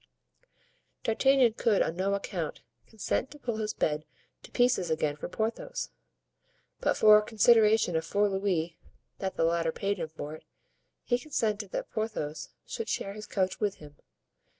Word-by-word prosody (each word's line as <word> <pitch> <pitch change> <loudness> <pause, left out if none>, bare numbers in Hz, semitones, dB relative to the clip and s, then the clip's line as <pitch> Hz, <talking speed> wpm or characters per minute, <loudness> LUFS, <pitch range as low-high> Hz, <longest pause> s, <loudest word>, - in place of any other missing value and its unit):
D'Artagnan 255 +1 +4
could 220 -2 +2
on 160 - -3
no 195 +2 +1
account 180 -5 -4 0.2
consent 225 +4 -2
to 295 - -12
pull 240 -6 -3
his 215 -1 -2
bed 150 0 0 0.4
to - - -13
pieces 245 -8 +2
again 155 -2 0
for 150 - -6
Porthos, 225 - -3 0.9
but - - +1
for 215 -1 +8
a - - -1
consideration 220 -3 +4
of 160 - +1
four 205 +5 +2
louis 190 -4 -1 0.4
that 190 -1 -3
the - - +1
latter 165 0 +1
paid 200 +4 -2
him 165 - -2
for 155 -1 -7
it, 155 - -10 0.6
he 245 0 +1
consented 215 -8 -1
that - - -4
Porthos 155 -9 -3 0.2
should 455 - -5
share 195 - -2
his 210 +1 -9
couch 190 -2 -1
with 205 -2 0
him. 145 -1 -14
200 Hz, 160 wpm, -29 LUFS, 165-220 Hz, 0.9 s, for